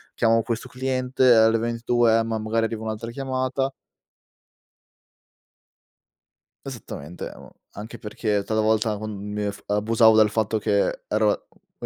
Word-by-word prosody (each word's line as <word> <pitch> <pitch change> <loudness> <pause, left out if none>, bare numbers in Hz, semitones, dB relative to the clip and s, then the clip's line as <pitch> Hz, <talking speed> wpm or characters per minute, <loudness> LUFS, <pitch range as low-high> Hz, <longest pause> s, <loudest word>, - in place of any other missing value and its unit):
chiamo 115 0 +3
questo 115 +1 -4
cliente," 130 -1 +2
alle 110 0 +5
ventitue: 115 0 +2
"Eh, 115 - +1
ma 110 -1 -2
magari 115 +1 0
arriva 110 -1 -4
un'altra 110 +1 -5
chiamata" 135 +1 -2 2.9
Esattamente, 90 - -7
amo - - -14 0.2
anche 105 +2 -8
perché 105 -1 -2
talvolta 110 0 +1
quan 110 +1 -6 0.2
mi 105 0 -3
eff 100 0 -4
abusavo 110 +2 +4
del 110 -1 +5
fatto 110 0 0
che 100 -1 0
ero 105 -1 0
e - - -13
110 Hz, 125 wpm, -24 LUFS, 110-120 Hz, 2.9 s, alle